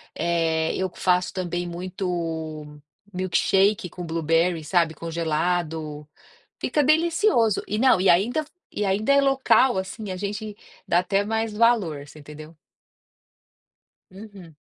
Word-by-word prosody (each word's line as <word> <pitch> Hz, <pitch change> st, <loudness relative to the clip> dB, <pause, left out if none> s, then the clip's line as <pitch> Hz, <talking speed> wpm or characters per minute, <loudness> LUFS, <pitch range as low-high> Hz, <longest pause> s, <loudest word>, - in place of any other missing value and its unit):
eh, 165 Hz, -1 st, 0 dB
eu 185 Hz, -1 st, -2 dB
faço 180 Hz, 0 st, +1 dB
também 175 Hz, -1 st, -3 dB, 1.5 s
milkshake 185 Hz, +1 st, +1 dB
com 180 Hz, +1 st, -8 dB
blueberry, 165 Hz, +1 st, 0 dB
sabe, 165 Hz, 0 st, +1 dB
congelado, 160 Hz, -2 st, -2 dB, 0.5 s
fica 295 Hz, -, 0 dB
delicioso. 320 Hz, -, +2 dB
E 210 Hz, -, -2 dB
não, 255 Hz, -6 st, +4 dB
e 190 Hz, -, +3 dB
ainda 240 Hz, -, +2 dB, 0.3 s
e 210 Hz, -, -1 dB
ainda 200 Hz, +6 st, +1 dB
é 280 Hz, -, +5 dB
local, 265 Hz, -4 st, +3 dB
assim, 190 Hz, +2 st, -5 dB
a -, -, -4 dB
gente 205 Hz, +2 st, -5 dB, 0.3 s
dá 175 Hz, -, +3 dB
até 195 Hz, +3 st, 0 dB
mais 225 Hz, +1 st, -1 dB
valor, 210 Hz, -11 st, +1 dB
você 155 Hz, -, -14 dB
entendeu? 150 Hz, +2 st, -12 dB, 1.5 s
Uhum. 190 Hz, -4 st, -13 dB
185 Hz, 120 wpm, -24 LUFS, 165-215 Hz, 1.5 s, é